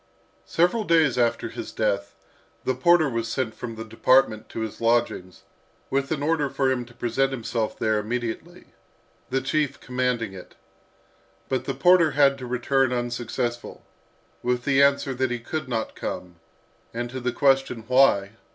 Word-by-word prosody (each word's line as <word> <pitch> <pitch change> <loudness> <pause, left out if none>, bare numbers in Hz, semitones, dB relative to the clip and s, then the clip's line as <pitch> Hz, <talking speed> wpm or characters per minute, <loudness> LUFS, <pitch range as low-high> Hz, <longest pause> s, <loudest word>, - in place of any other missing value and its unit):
Several 180 +7 +2
days 160 - +3
after 115 -1 +1
his 115 0 -7
death, 100 -2 -1 0.5
the 130 - +1
porter 160 +5 +4
was 115 -3 -2
sent 115 -1 -2
from 115 -1 -7
the 110 0 -7
department 115 0 +2
to - - -5
his 110 0 -5
lodgings, 115 -6 0 0.5
with 135 0 0
an 145 -3 -1
order 150 -2 +1
for 135 -1 +1
him 125 -2 -1
to 120 0 -18
present 130 +3 0
himself 115 -3 -3
there 110 -1 +1
immediately, 120 +10 -5 0.6
the 135 +1 0
chief 145 +1 -1
commanding 125 -4 -2
it. 90 -2 -12 0.9
But 130 -1 -1
the - - -3
porter 180 -2 +5
had 140 -1 +4
to 125 - -6
return 130 +1 +1
unsuccessful, 120 -1 -3 0.6
with 125 0 -1
the 140 -1 +4
answer 140 -1 +3
that 130 0 0
he 125 - -2
could 150 +4 -5
not 115 -3 -2
come; 90 -1 -6 0.6
and 120 +1 -2
to 130 - -5
the 125 0 -1
question, 135 -4 +2
"Why?" 125 -7 +4
125 Hz, 160 wpm, -25 LUFS, 115-135 Hz, 0.9 s, porter